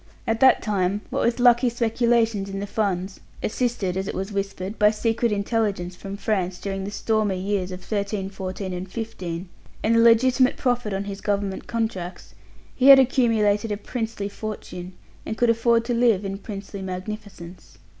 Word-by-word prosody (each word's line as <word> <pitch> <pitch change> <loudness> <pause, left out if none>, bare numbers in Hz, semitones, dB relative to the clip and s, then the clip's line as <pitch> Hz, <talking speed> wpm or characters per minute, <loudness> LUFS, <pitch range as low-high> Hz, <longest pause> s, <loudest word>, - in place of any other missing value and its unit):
At 225 0 0
that 265 +1 +5
time, 200 -1 0
what - - 0
with 235 +1 +1
lucky 245 0 +5
speculations 230 -3 +1
in 195 0 -4
the 200 - -3
Funds 195 -3 -2 0.2
assisted, 225 -6 -1
it 190 +2 -3
was 195 +2 -3
whispered, 195 0 -4
by 210 - +6
secret 225 +2 0
intelligence 200 -4 -1
from 195 +2 -7
France 190 -4 -1
during 195 0 -4
the - - -4
stormy 205 -2 0
years 190 -1 -1
of 180 0 -7
'13, 200 -2 -2
'14, 190 0 -5
and 180 +1 -6
'15 190 -6 -5 0.4
and 225 +1 +3
the - - +5
legitimate 245 +3 +5
profit 245 -4 0
on 195 0 -2
his 200 -1 -6
Government 200 -2 -2
contracts, 220 -6 -4 0.4
he 265 - +3
had 275 -1 +11
accumulated 225 -5 +2
a 205 - -1
princely 225 -1 -4
fortune, 200 -4 -7 0.3
and 220 - -5
could 240 -1 +4
afford 230 0 +2
to 240 - -1
live 230 -5 +3
in 195 0 -4
princely 200 -1 -7
magnificence. 185 -1 -8
205 Hz, 165 wpm, -24 LUFS, 195-230 Hz, 0.4 s, had